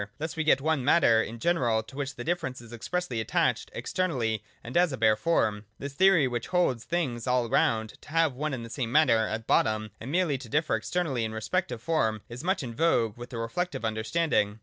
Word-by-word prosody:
Thus 155 +1 -4
we 160 - -1
get 145 -3 +4
one 155 -2 +1
Matter 120 -6 +5
in 115 +1 -5
general 120 -7 +1
to 115 +4 -14
which 140 -1 -4
the 120 - -6
difference 160 -6 -2
is 120 0 -12
expressly 130 +1 -3
attached 110 - 0
externally 120 - -1 0.2
and 120 - -8
as 175 -2 +4
a 130 - -4
bare 110 -2 +4
form. 110 -5 0
This 140 0 -6
theory 180 -3 +5
which 120 -2 -3
holds 175 -10 +1
things 135 -9 -2
all 125 -1 +2
round 110 -1 0
to - - -15
have 165 -2 +2
one 145 +2 -2
and 120 -2 -6
the - - -10
same 120 -4 -3
matter 120 -7 +4
at 110 +1 -4
bottom, 110 -1 +1
and 125 +5 -6
merely 165 -5 +1
to 125 -3 -10
differ 150 +5 +1
externally 155 -10 -1
in 110 0 -3
respect 110 +3 -1
of 120 -2 -6
form, 110 -10 0
is 120 +4 -8
much 185 -3 0
in 120 -2 -5
vogue 120 -7 +2
with 120 0 -9
the 120 - -6
reflective 115 +6 -3
understanding. 110 -1 0
125 Hz, 215 wpm, -28 LUFS, 115-160 Hz, 0.2 s, Matter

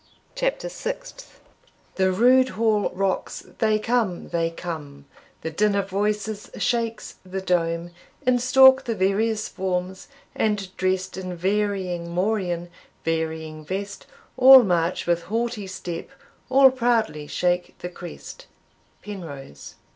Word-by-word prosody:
CHAPTER - - -1
SIXTH. - - -7 0.5
The 190 -1 +2
rude 255 +6 +5
hall 220 -2 +2
rocks 190 0 -2
they 215 -1 +3
come, 215 -4 -1
they 165 -1 0
come, 155 -5 -7 0.4
The 160 - -4
din 205 +5 +2
of 200 -1 -1
voices 210 +1 -2
shakes 230 -1 -2
the 190 +1 -5
dome; 170 -2 -1 0.3
In 250 -1 +3
stalk 265 +1 +6
the 230 -3 -1
various 215 +3 +1
forms, 185 0 -3 0.3
and, 200 -3 -1
drest 185 0 -1
In 185 -1 -5
varying 190 -2 -1
morion, 175 -2 -1 0.3
varying 160 -1 -3
vest, 195 +5 -5 0.3
All 260 0 +10
march 175 -3 0
with 170 0 0
haughty 225 -2 -2
step 175 -2 -6 0.4
all 265 0 +7
proudly 230 - 0
shake 180 +2 -1
the 180 - -6
crest. 180 - -10 0.6
Penrose. 145 - -9
190 Hz, 120 wpm, -24 LUFS, 175-225 Hz, 0.6 s, All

